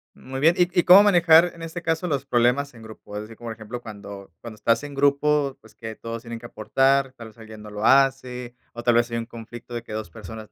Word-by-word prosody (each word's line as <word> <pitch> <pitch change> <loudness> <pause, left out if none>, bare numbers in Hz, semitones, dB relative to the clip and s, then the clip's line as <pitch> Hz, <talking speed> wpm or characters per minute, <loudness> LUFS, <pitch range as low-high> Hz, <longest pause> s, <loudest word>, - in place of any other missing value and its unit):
Muy 130 +1 -7
bien, 165 +5 +4
¿y 180 - +4
y - - +3
cómo 185 +3 +8
manejar, 175 -3 +5
en 170 - -14
este 165 +1 -6
caso, 165 +2 -1
los 140 -4 -2
problemas 125 +3 +1
en 115 - -14
grupo? 110 -2 -12
Es 105 - -4
decir, 110 +1 -13
por 115 -1 -7
ejemplo, 110 +2 -8
cuando 100 -4 -10
cuando 115 -2 -9
estás 115 +4 +1
en 145 -1 -8
grupo, 140 0 +1
pues, - - -20
que 110 0 -8
todos 115 +1 -7
tienen 115 -1 -7
que - - -10
aportar, 135 +4 +1
tal 115 -3 -11
vez 110 - -17
alguien 110 -1 -12
no 105 - -10
lo 105 +1 -4
hace, 130 -2 +2 0.2
o 120 - -7
tal 120 -1 +3
vez 120 0 +2
hay 115 - -2
un 115 - -3
conflicto 120 +1 -11
de 120 - -5
que - - -10
2 110 -4 -5
personas 110 +6 -10
120 Hz, 250 wpm, -23 LUFS, 110-140 Hz, 0.2 s, cómo